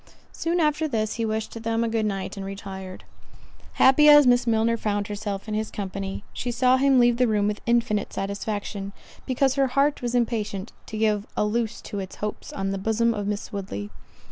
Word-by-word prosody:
Soon 340 +2 -1
after 305 0 +2
this, 220 -6 -1
he - - +1
wished 220 +1 -3
them 225 0 0
a - - 0
good 225 -1 0
night, 195 -1 -3
and 195 - -6
retired. 190 -1 -7 0.7
Happy 300 +3 +6
as 295 -1 +9
Miss 245 0 +4
Milner 225 0 +2
found 205 -2 -1
herself 205 -1 -5
in 215 - -3
his 215 +1 -1
company, 195 0 -5
she 245 - -4
saw 250 +2 +3
him 270 0 +4
leave 240 -1 +4
the 250 0 +3
room 210 -2 +1
with 210 0 -2
infinite 235 -3 +1
satisfaction, 200 0 -4 0.3
because 265 0 +2
her 275 -1 +2
heart 275 +3 +1
was 245 0 -2
impatient 215 -4 -1 0.2
to 215 - -6
give 215 -2 +1
a - - +2
loose 225 +1 -1
to 205 - -6
its 190 -1 -6
hopes 210 0 -5
on 195 0 -2
the 195 - -2
bosom 225 +3 +1
of 205 -2 -3
Miss 205 +1 -4
Woodley. 105 - -5
220 Hz, 195 wpm, -25 LUFS, 200-240 Hz, 0.7 s, as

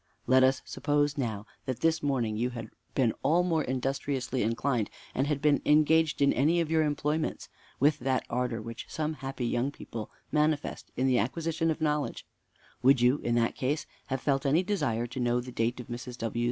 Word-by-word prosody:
"Let 130 +1 +5
us 130 0 +3
suppose, 145 0 0
now, 110 -7 -3 0.2
that 130 -2 -3
this 165 0 +2
morning 125 -7 0
you 120 +3 0
had 115 -3 -7 0.2
been 125 -5 +3
all 165 +6 +3
more 165 -3 +1
industriously 130 0 -2
inclined; 115 0 0 0.2
and 135 +2 0
had 145 -2 -1
been 150 -2 +4
engaged 155 0 +4
in 140 - +4
any 155 +7 +3
of 165 -2 -1
your 160 -1 +4
employments 150 +1 -1 0.3
with 145 +2 +3
that 130 +1 0
ardor 120 -2 -2
which 115 +1 -7
some 155 0 -2
happy 135 -4 -4
young 120 +3 0
people 115 -6 -7 0.2
manifest 150 -1 0
in 130 - +1
the 130 -2 +3
acquisition 165 +8 -1
of 160 0 -2
knowledge; 150 -2 -1 0.6
would 135 0 +5
you, 125 +4 +4
in 120 - 0
that 115 -1 +2
case, 145 +4 -1 0.2
have 135 -1 -2
felt 135 -2 +1
any 150 +6 +3
desire 145 - 0
to 125 +2 -6
know 120 0 +2
the 125 +1 -7
date 120 +1 -1
of 125 - -6
Mrs. 120 +1 -7
W.' 115 0 -3
135 Hz, 195 wpm, -29 LUFS, 120-150 Hz, 0.6 s, Let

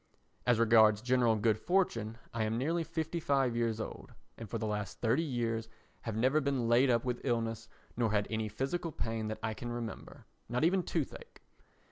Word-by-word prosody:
As 120 -2 +5
regards 110 -2 +5
general 120 -2 +3
good 110 0 +2
fortune, 115 - 0 0.2
I 115 -1 0
am 110 +1 0
nearly 165 +7 0
fifty 165 +1 -3
five 135 -5 +1
years 115 -2 0
old - - -7 0.2
and 115 -3 -9
for 115 - -2
the 110 - -3
last 105 -4 -3
thirty 120 +6 +2
years 115 -6 -2 0.3
have 115 -2 -4
never 130 +7 +3
been 135 -4 0
laid 120 +3 +5
up 120 0 +2
with 125 -1 -2
illness 115 -3 -1 0.3
nor 115 -3 +1
had 105 -1 +2
any 110 -1 -1
physical 160 +9 -2
pain 115 -5 -3
that 110 - -3
I 110 -1 -1
can 120 +2 -6
remember, 120 -2 -6 0.2
not 125 +4 0
even 185 +3 +4
toothache. 475 - -4
115 Hz, 185 wpm, -32 LUFS, 110-135 Hz, 0.3 s, As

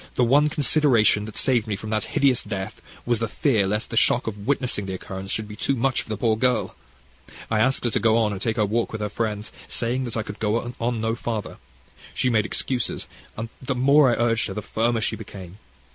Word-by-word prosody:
the 125 - +3
one 145 +5 +4
consideration 140 -8 +4
that 110 -1 -9
saved 120 -4 +2
me 105 - -1
from 105 +3 -7
that 110 -1 0
hideous 135 -3 +4
death 95 -2 -5 0.2
was 120 -2 +1
the 115 - -1
fear 110 -6 +1
lest 105 +3 -2
the - - -3
shock 120 +2 +4
of 105 -1 -6
witnessing 125 -7 0
the 95 - -3
occurrence 95 +1 -7
should 110 +1 -2
be 105 - -9
too 140 - 0
much 130 +1 +1
for - - -13
the 110 - -2
poor 110 0 +2
girl. 125 +3 +1 0.8
I 110 - +2
asked 130 +4 +2
her 120 - 0
to - - +1
go 115 0 +3
on 110 -2 +2
and 110 +3 -2
walk 115 +1 0
with 110 - -5
her 105 - -1
friends, 105 -1 -3
saying 125 +3 -1
that 115 -2 -4
I 110 - -1
could 105 -1 -8
go 115 +3 -1
no 115 -2 -1
further. 115 -3 -4 0.6
She 125 - +1
made 110 -2 +2
excuses, 125 -1 -1 0.3
and 115 +1 -4
the 130 0 -2
more 140 +2 +5
I - - +3
urged 115 -1 +1
her 95 - -6
the 105 - -4
firmer 115 +2 0
she - - 0
became. 95 -3 -10
115 Hz, 220 wpm, -24 LUFS, 105-125 Hz, 0.8 s, more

